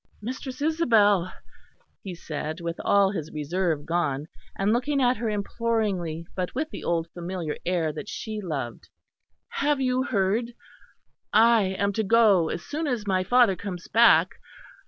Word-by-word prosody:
"Mistress 255 +4 -6
Isabel," 215 - +3 0.7
he 185 -3 -6
said, 155 0 -5
with 170 0 -5
all 200 -1 +4
his 160 -6 -5
reserve 155 0 -2
gone, 155 -4 -1 0.3
and 200 +2 +2
looking 275 +4 0
at 250 -1 +3
her 225 +1 -2
imploringly, 205 -6 -2
but 185 +2 -3
with 310 +4 -2
the - - -7
old 165 -1 0
familiar 175 -3 -4
air 170 -4 0
that 155 +7 -7
she 215 -1 -5
loved, 140 - -5 0.6
"have 290 0 0
you 255 -1 +1
heard? 225 0 0 0.8
I 220 -3 +4
am 200 0 0
to 220 - 0
go 205 -6 +4
as 170 - -4
soon 310 +2 -3
as 240 -6 -2
my 185 -2 +1
father 235 0 +4
comes 180 -2 -7
back. 235 +2 +5
200 Hz, 150 wpm, -25 LUFS, 170-235 Hz, 0.8 s, back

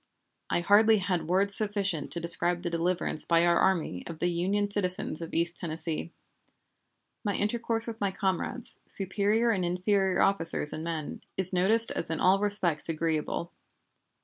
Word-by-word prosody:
I - - 0
hardly 215 +4 +4
had 180 -5 -2
words 195 +3 +1
sufficient 200 -7 -1
to 170 - -1
describe 175 +1 0
the 170 - -3
deliverance 170 -2 0
by 170 0 +2
our 170 0 +3
army 165 - 0
of 165 - -8
the 175 +2 -1
Union 195 +4 -1
citizens 185 -5 -2
of 165 - -7
East 170 +1 -1
Tennessee. 160 0 -3 1.1
My 205 -3 -2
intercourse 225 +2 -1
with 230 -2 -7
my 200 - +1
comrades, 190 +4 -2
superior 205 +4 +1
and 190 -4 -1
inferior 185 +2 0
officers 165 -6 +3
and 155 - -6
men, 165 -3 -5 0.2
is 190 0 +5
noticed 215 +6 +4
as - - -3
in 160 - -3
all 190 +2 +3
respects 195 -7 0
agreeable. 165 +1 -3
180 Hz, 155 wpm, -28 LUFS, 170-205 Hz, 1.1 s, is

